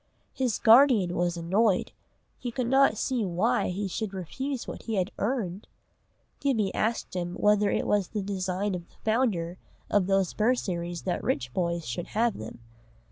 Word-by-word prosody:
His 250 -5 0
guardian 225 -6 +6
was 175 0 0
annoyed, 190 +4 +1 0.5
he 245 - -4
could 250 +1 -2
not 265 -2 +4
see 250 0 0
why 205 +7 +1
he 195 +2 -2
should 200 +1 -4
refuse 260 - -4
what - - -6
he 225 - -3
had 185 -1 0
"earned." 205 -5 -2 0.7
Gibbie 225 -9 +1
asked 225 -3 -1
him 175 -1 -3
whether 210 0 +3
it - - 0
was 205 -3 +1
the 210 -2 -3
design 190 0 -2
of 175 -1 -6
the - - -26
founder 210 -7 0 0.3
of 200 -3 +3
those 195 -2 +2
bursaries 180 -7 -1
that 180 - -2
rich 125 -2 -1
boys 170 -2 -1
should 120 +8 -4
have 230 0 0
them. 110 +2 -8
200 Hz, 165 wpm, -28 LUFS, 180-230 Hz, 0.7 s, guardian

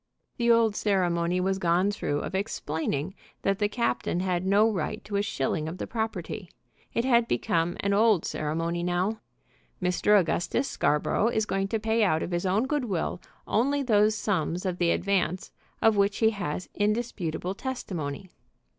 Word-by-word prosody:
The 235 -2 +1
old 230 -2 +4
ceremony 180 -4 +1
was 190 +1 0
gone 180 +3 +2
through 145 -7 -2
of - - -5
explaining 160 -4 -2 0.3
that 195 0 +1
the 205 -1 +2
captain 235 -5 -1
had 185 -1 -1
no 205 +3 +5
right 215 0 -2
to 205 0 -5
a 200 - +2
shilling 155 -5 -1
of 170 - -7
the - - -4
property. 215 -5 -4 0.4
It 235 - 0
had 235 -3 +4
become 165 +8 0
an 200 0 +1
old 210 -4 +4
ceremony 165 +3 -2
now. 180 +5 0 0.6
"Mr. 185 +3 +3
Augustus 175 - 0
Scarborough 150 +8 +1
is 220 -2 +1
going 195 -1 -1
to 225 +2 -1
pay 220 +1 +1
out 160 -5 +2
of - - -5
his 175 +2 -1
own 205 +7 +2
good 290 -1 -1
will 180 -3 -2 0.2
only 280 +6 +1
those 215 -3 +3
sums 180 -3 -1
of 180 -1 -2
the 175 -1 +3
advance 185 -1 0 0.3
of 225 -2 +5
which 200 0 +2
he 220 -1 +4
has 185 -5 -4
indisputable 205 -5 -1
testimony." 190 - -5
195 Hz, 165 wpm, -27 LUFS, 175-220 Hz, 0.6 s, no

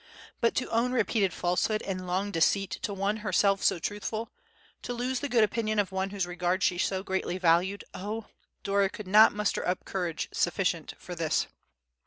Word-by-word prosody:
But 230 - +2
to 255 - 0
own 235 +2 +1
repeated 220 -5 +2
falsehood 180 +6 0
and 185 -2 -4
long 190 +3 -1
deceit 195 +3 +2
to 210 - -2
one 200 +2 -1
herself 195 -1 +2
so - - +3
truthful, 210 +5 -4 0.5
to 245 - -4
lose 250 +1 -1
the 285 - -3
good 240 -3 +4
opinion 215 0 0
of 205 -2 +1
one 190 +1 -1
whose 195 -2 -2
regard 180 +1 -1
she 180 -3 +2
so 190 0 0
greatly 190 -2 -2
valued, 185 +3 +2
oh! 210 +3 -5 0.4
Dora 200 -1 +2
could 210 - -8
not 215 +3 +7
muster 210 0 -1
up 180 0 -2
courage 175 -4 -2
sufficient 175 -2 0
for 180 - -8
this! 165 -2 0
195 Hz, 180 wpm, -29 LUFS, 180-215 Hz, 0.5 s, not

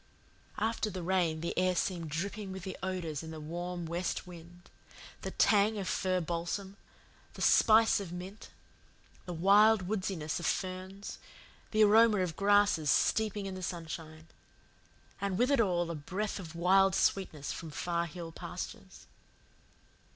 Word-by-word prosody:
After 220 0 -1
the 185 -3 -6
rain 170 -3 +1
the 170 - -3
air 185 0 +2
seemed 170 -3 -2
dripping 195 +5 -4
with 190 0 -7
odours 175 -6 -3
in 160 - -8
the 160 -1 -7
warm 175 +3 -5
west 170 +2 -3
wind 175 0 -13 0.5
the - - -4
tang 210 +1 +3
of 195 -2 -3
fir 185 -1 0
balsam, 175 +4 -3 0.6
the - - -8
spice 220 0 +5
of 195 -4 -6
mint, 185 +4 -8 0.8
the 180 - -4
wild 200 +3 +5
woodsiness 185 -7 -2
of 170 - -2
ferns, 190 +1 -4 0.5
the 215 0 +4
aroma 215 +1 +6
of 175 -4 -2
grasses 200 -6 +3
steeping 210 +4 +2
in 195 - -4
the 185 - -7
sunshine, 160 -2 -6 1.0
and 200 -2 -1
with 250 +5 +2
it 275 -4 +4
all 175 -5 0
a - - -3
breath 190 +8 -4
of 170 -3 -9
wild 190 +2 +4
sweetness 160 -7 0
from 165 - -6
far 170 +2 -2
hill 170 0 -8
pastures. - - -8
185 Hz, 145 wpm, -31 LUFS, 170-200 Hz, 1.0 s, aroma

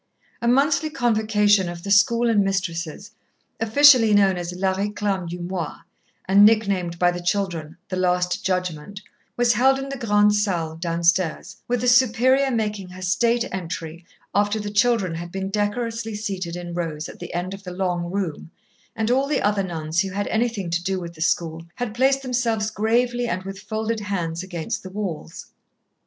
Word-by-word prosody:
A 235 - -1
monthly 285 +5 +3
convocation 215 - +2
of 170 0 -8
the 200 - -4
school 235 +4 +4
and 215 -3 +3
mistresses, 185 0 -3 0.5
officially 225 -1 +6
known 195 -2 +4
as 175 -1 -4
la 190 +1 0
réclame 200 -2 -2
du 175 +1 -6
mois, 175 0 -4 0.5
and 195 +2 +6
nicknamed 200 -6 +3
by 175 0 +3
the 175 0 -5
children 175 -4 -2
"the 185 - -3
Last 180 -1 0
Judgment," 180 +1 -3 0.4
was 240 0 +4
held 265 +4 +4
in 270 0 -5
the 275 -1 -5
Grande 210 -3 +3
Salle 175 -6 -1
downstairs, 170 0 0
with 245 -1 0
the 250 - 0
Superior 255 +2 +4
making 210 -5 -2
her 185 +1 -11
state 235 +6 +2
entry 170 -2 -5 0.3
after 205 +1 +1
the 205 -1 -5
children 210 -4 +2
had 170 +1 -6
been 195 +1 -4
decorously 225 +2 -2
seated 190 -5 -4
in 175 -1 -6
rows 160 -3 -3
at - - -12
the - - -7
end 180 +2 -3
of 195 - -8
the 190 - -8
long 180 -1 -2
room, 180 -5 -4 0.5
and 220 +1 0
all 270 +2 +2
the 300 - 0
other 205 -1 +2
nuns 165 -2 -1
who 195 - -2
had 200 +2 -2
anything 220 -6 -1
to 170 +1 -1
do 190 0 -1
with 170 -1 -7
the 160 - -12
school 165 0 0
had 245 -3 -4
placed 270 +3 +2
themselves 230 -4 0
gravely 240 +3 +1
and 185 -4 -2
with 195 0 -7
folded 220 +2 -3
hands 175 -5 -3
against 175 -4 -4
the 185 - -9
walls. 185 - -6
200 Hz, 175 wpm, -23 LUFS, 175-225 Hz, 0.5 s, officially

